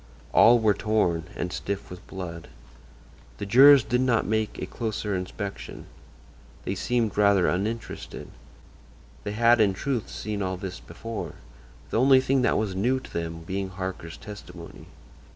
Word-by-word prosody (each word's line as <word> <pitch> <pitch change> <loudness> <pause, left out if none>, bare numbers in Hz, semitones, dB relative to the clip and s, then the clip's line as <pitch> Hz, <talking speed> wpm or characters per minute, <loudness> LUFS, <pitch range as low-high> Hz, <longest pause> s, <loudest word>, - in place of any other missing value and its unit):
All 120 +1 +7
were 110 -3 +3
torn, 95 -6 0
and 90 - -3
stiff 100 -2 -4
with 90 - -10
blood. 85 -4 -7 0.9
The 100 - -4
jurors 135 +5 +8
did 125 +2 0
not 125 -3 +2
make 110 0 -1
a - - -4
closer 110 -3 -3
inspection. 100 +2 -6 0.8
They 95 - -1
seemed 110 +1 -1
rather 100 -3 +4
uninterested. 110 +6 -3 0.9
They 105 - -4
had, 115 +1 +4
in 100 -3 +3
truth, 130 -1 -2
seen 105 -1 -4
all 95 -1 -2
this 95 -1 -6
before; 110 +7 -7 0.6
the - - +1
only 135 0 +6
thing 130 0 +1
that 125 - +2
was 105 -3 -1
new 120 +8 +1
to - - -14
them 85 0 -4
being 95 +3 -3
Harker's 95 -3 -6
testimony. 100 -5 -11
105 Hz, 150 wpm, -26 LUFS, 95-115 Hz, 0.9 s, jurors